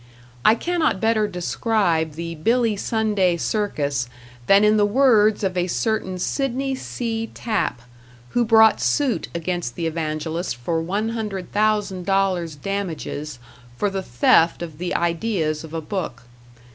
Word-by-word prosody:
I 220 - +6
cannot 330 - 0
better 220 -1 +2
describe 180 -3 0
the 165 +2 -5
Billy 230 +7 +1
Sunday 205 -4 +1
circus 145 - -1 0.4
than 195 +1 +6
in 210 0 +4
the 205 - +4
words 220 -3 +4
of 190 -1 0
a 180 0 0
certain 190 -1 -1
Sidney 270 +6 -1
C. 225 -3 -3
Tapp, 215 - -2 0.5
who 240 - +1
brought 220 -1 +5
suit 280 -5 +1
against 170 -6 -3
the 170 - -3
evangelist 160 -1 -2
for 160 +7 -2
$100,000 195 -4 -1
damages 160 -7 -4 0.4
for 205 +6 0
the 195 0 -2
theft 165 +4 +3
of 160 -3 -8
the 180 0 -2
ideas 170 -3 0
of 160 - -10
a 165 0 -3
book. 155 - -4
195 Hz, 130 wpm, -22 LUFS, 165-220 Hz, 0.5 s, I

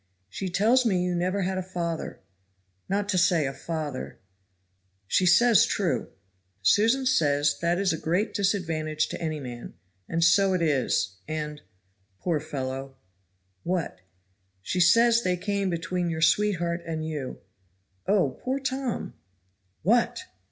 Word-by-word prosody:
"She 190 - -4
tells 225 +8 +3
me 190 -6 +1
you 180 0 -1
never 185 +3 0
had 185 +1 -1
a - - -1
father, 175 -3 -4 0.7
not 200 +1 0
to 185 -3 +2
say 170 -3 +3
a 135 - -3
father 150 -3 -5 0.5
" 95 +1 -45
"She 185 - +2
says 220 +4 +6
true." 185 -5 -1 0.5
"Susan 230 - +3
says 145 - +2
that 170 +1 +1
is 190 -3 +1
a 160 - -4
great 180 +7 0
disadvantage 165 -6 -1
to - - -6
any 155 -2 -2
man, 120 -3 -8 0.3
and 165 0 0
so 190 +3 +4
it 180 - 0
is 130 - 0
and 150 -1 -4 0.6
poor 165 - -1
fellow 135 -1 -5 0.3
" - - -46 0.3
"What?" 175 - -2 0.6
"She 185 - -2
says 230 +6 +5
they 180 -4 0
came 200 +1 -1
between 175 +1 -2
your 160 -1 -1
sweetheart 175 -1 +2
and 160 -1 -4
you 145 -5 -5 0.7
Oh! 185 -10 +1
poor 260 +2 -1
Tom!" 265 -2 -3 0.7
"What?" 235 - +2
175 Hz, 145 wpm, -26 LUFS, 155-200 Hz, 0.7 s, says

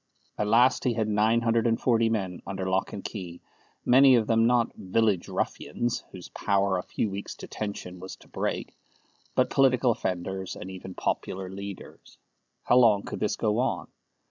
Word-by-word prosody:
At 105 - -1
last 120 +4 +4
he 125 -3 +1
had 110 -1 0
nine 110 +2 +2
hundred 115 0 +2
and 115 0 +1
forty 115 -2 +2
men 95 -5 -2
under 95 -1 -3
lock 95 0 0
and 100 - -7
key, 90 -5 -6 0.5
many 130 +1 +7
of 115 -2 +2
them 115 +1 +3
not 120 -1 +2
"village 100 -1 0
ruffians," 120 0 -2
whose 90 -2 -10
power 100 -2 +1
a - - -2
few 110 - -2
weeks' 100 +1 -6
detention 100 -4 -6
was 95 +1 -8
to - - -20
break, - - -3 0.6
but - - +2
political 130 -2 +4
offenders, 95 -2 -3
and 95 - -8
even 95 0 -9
popular 95 0 -3
leaders. 100 0 -9 0.5
How 125 - +4
long 110 -5 +5
could - - -6
this - - 0
go 105 +1 0
on? 125 - -1
105 Hz, 170 wpm, -27 LUFS, 95-115 Hz, 0.6 s, many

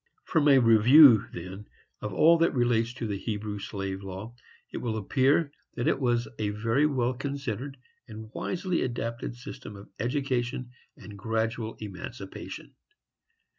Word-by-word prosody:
From 155 -3 +1
a 140 -2 +7
review, 120 +1 +7
then, 95 +4 -8 0.3
of 105 - -4
all 165 - +5
that 165 -3 +2
relates 120 -2 +2
to 125 - -4
the 100 -3 -3
Hebrew 105 -1 -4
slave 95 -1 -5
law, 95 +4 -7 0.4
it - - -3
will 115 -2 -2
appear 140 - +2 0.2
that 120 - -1
it - - +2
was 120 -3 +1
a 105 -1 0
very 115 +8 +1
well 130 -4 0
considered 135 -1 -5 0.3
and 110 -1 -10
wisely 185 -1 -2
adapted 120 -1 -3
system 120 -3 -9
of 100 0 -12
education 125 0 -2 0.3
and 100 0 -11
gradual 110 +1 -2
emancipation. 100 0 -8
115 Hz, 140 wpm, -28 LUFS, 105-135 Hz, 0.4 s, a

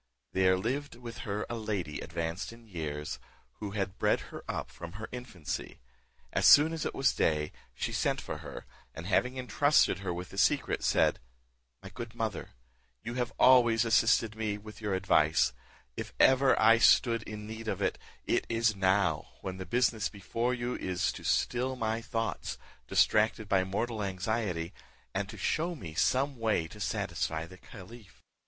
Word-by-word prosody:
There 95 0 +4
lived 135 +9 -2
with 120 -1 -9
her 105 +1 -2
a - - -5
lady 105 -9 -3
advanced 85 +4 -4
in 115 0 -14
years, 75 -7 -5 0.4
who 100 -2 -5
had 95 -1 -3
bred - - +3
her - - -7
up - - -3
from 85 +8 -9
her 105 +3 -6
infancy. 90 - -6 0.5
As - - +4
soon 155 +3 +8
as 160 - -2
it - - -6
was 135 - +3
day, 75 -1 +1 0.2
she - - -3
sent - - +1
for - - -6
her, - - -9 0.3
and 85 - -7
having 125 +7 +1
entrusted 130 - +3
her 95 -2 -3
with 90 +1 -5
the 95 - -5
secret, 140 +4 +2
said, - - +3 0.6
"My 95 - -8
good 120 0 -8
mother, 110 -5 -3 0.5
you 120 - -4
have 120 -2 -1
always 120 -3 +6
assisted 115 -1 +3
me 110 -2 -2
with 105 +1 -12
your 105 -3 -1
advice; 80 -5 +3 0.4
if - - -6
ever 130 0 +5
I 115 +1 +6
stood 115 -1 +5
in 105 -1 -7
need 110 +1 -7
of - - -2
it, - - -1 0.3
it - - 0
is 115 -1 +2
now, 95 -4 +2
when 95 -1 -5
the 95 -1 -7
business 120 0 +1
before 115 +5 -2
you 120 0 -3
is 90 -1 -1
to - - -10
still 125 +2 +1
my 115 -1 -1
thoughts, 115 0 -3 0.3
distracted 110 0 +3
by 95 -1 +3
a 95 - 0
mortal 110 +4 -2
anxiety, 95 -2 -2 0.4
and 100 +1 -2
to 110 - -8
show 170 +9 0
me 85 - -8
some 135 - +1
way 110 -8 +1
to - - -12
satisfy 80 0 -2
the 95 +2 -14
caliph." 105 +1 -13
110 Hz, 175 wpm, -30 LUFS, 95-120 Hz, 0.6 s, soon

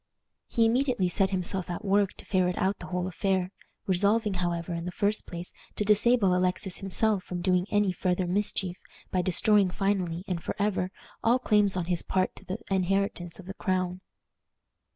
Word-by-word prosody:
He 230 - +2
immediately 245 -5 +2
set 190 +2 +2
himself 185 -1 -2
at 175 +5 -5
work 200 0 +2
to - - -13
ferret 180 -2 +1
out 190 +1 0
the 180 - -8
whole 180 -1 -2
affair, 185 0 -1 0.3
resolving, 205 +3 +2
however, 175 -1 -2
in 170 0 -4
the 180 - -3
first 205 +3 -1
place, 175 0 -7 0.2
to 210 - -1
disable 210 -2 +4
Alexis 180 +1 0
himself 200 0 +1
from 180 - -5
doing 180 0 +2
any 205 -2 +2
farther 180 0 0
mischief 185 -1 -1 0.3
by 185 - +2
destroying 195 +2 +3
finally 185 -3 -1
and 175 -2 -2
forever 200 -3 -1 0.3
all 235 +2 +4
claims 210 -6 +2
on 180 - -1
his 175 -1 0
part 185 -1 0
to - - -11
the 185 - -3
inheritance 190 -2 0
of 190 - -11
the 195 - -6
crown. 185 -2 -1
185 Hz, 175 wpm, -28 LUFS, 180-205 Hz, 0.3 s, disable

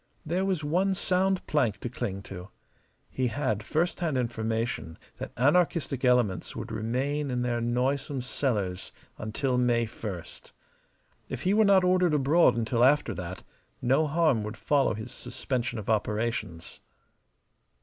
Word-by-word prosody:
There 175 +5 0
was 185 -5 0
one 185 +6 +1
sound 190 +1 +1
plank 125 -9 +1
to - - -3
cling 105 -5 -4
to. 95 0 -9 0.6
He 130 -1 0
had 115 -3 -1
first 160 +10 0
hand 160 -6 0
information 115 -7 -2 0.2
that - - -5
anarchistic 145 -1 +2
elements 125 -8 +2
would - - -6
remain 135 +6 -1
in 125 -1 -1
their 120 -1 -1
noisome 130 +3 0
cellars 105 -8 -2 0.3
until 125 +4 -1
May 120 -1 +2
first. 105 -6 -8 0.8
If 130 0 -5
he 190 - +2
were 220 +1 +5
not 195 -2 +5
ordered 180 -3 +3
abroad 150 0 +4
until 115 +1 +1
after 145 +3 +4
that, 90 +1 -6 0.4
no 135 +6 +2
harm 155 -6 +2
would 105 +2 -6
follow 140 -6 +2
his 110 +3 -7
suspension 125 0 -3
of 105 - -6
operations. 105 -5 -2
125 Hz, 140 wpm, -28 LUFS, 110-150 Hz, 0.8 s, were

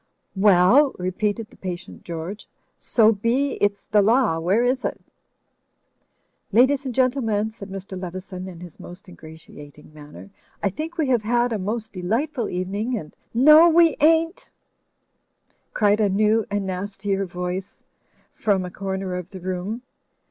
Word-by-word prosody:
"Well?" 205 +8 +5
repeated 205 +4 -2
the - - -18
patient 180 -1 -7
George. 170 +5 -7 0.3
So 225 -2 +4
be 240 +7 0
it's 200 0 +1
the 210 - +5
Law, 220 -5 +2
where 190 +8 +2
is 255 +1 0
it?" - - -3 1.5
"Ladies 260 +5 +3
and 250 - -5
Gentlemen," 230 -5 +1
said 200 -2 -11
Mr. 190 -1 -7
Leveson, 185 +1 -7
in 175 -2 -10
his 175 -3 -12
most 180 +3 -12
ingratiating 155 -3 -14
manner, 150 +6 -13 0.3
"I 200 - +1
think 315 - -6
we 305 -5 0
have 245 -4 +3
had 240 +2 +1
a 215 - -2
most 220 +3 -4
delightful 230 - -2
evening, 200 +7 -2
and 155 -6 -9
— - - -44
" - - -44 0.2
"No, 325 +3 +9
we 330 -2 +5
ain't," 325 +3 +2 1.3
cried 210 -1 +3
a 210 -2 +3
new 215 +2 +2
and 205 -1 -2
nastier 195 +1 -3
voice 180 +2 -5 0.5
from 195 -4 0
a 180 - -7
comer 190 -1 -4
of 180 0 -6
the 190 - -9
room. 185 +6 -4
205 Hz, 150 wpm, -23 LUFS, 185-235 Hz, 1.5 s, No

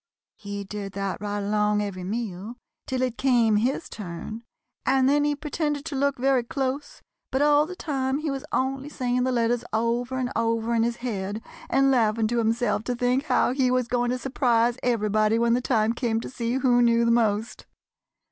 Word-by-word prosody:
He 200 -1 -5
did 200 0 -6
that 195 -1 -3
right 205 0 -3
along 210 +1 +1
every 190 -3 -5
meal 210 +1 -4 0.3
till 255 -1 -1
it 250 -2 -2
came 235 -5 +3
his 255 +9 0
turn, 210 +3 -7 0.4
and 265 -1 +3
then 290 +1 +3
he 295 0 +1
pretended 295 0 -2
to 320 - -4
look 280 +1 +1
very 265 0 +2
close, 270 +3 -4 0.3
but 265 +2 +1
all 295 +1 +4
the 365 - -7
time 270 -5 -1
he 305 -1 -2
was 270 -1 -4
only 270 +2 -1
saying 250 -3 -1
the 260 - +1
letters 240 0 +1
over 235 +3 0
and 255 -1 -2
over 230 0 0
in 230 - +2
his 235 +1 0
head 205 -2 -3 0.3
and 270 +1 +3
laughing 225 -3 +2
to 240 0 +1
himself 225 -1 +1
to 245 - -1
think 250 +3 +1
how 250 -3 +2
he 260 -1 +2
was 255 -1 +1
going 245 0 0
to 250 - 0
surprise 240 -2 +1
everybody 215 -2 +2
when 235 0 +2
the 245 - +2
time 225 -3 +1
came 235 -2 -1
to - - -7
see 235 -2 -2
who 250 -2 +3
knew 235 0 +4
the 235 - +3
most. 225 -1 0
240 Hz, 195 wpm, -25 LUFS, 220-265 Hz, 0.4 s, all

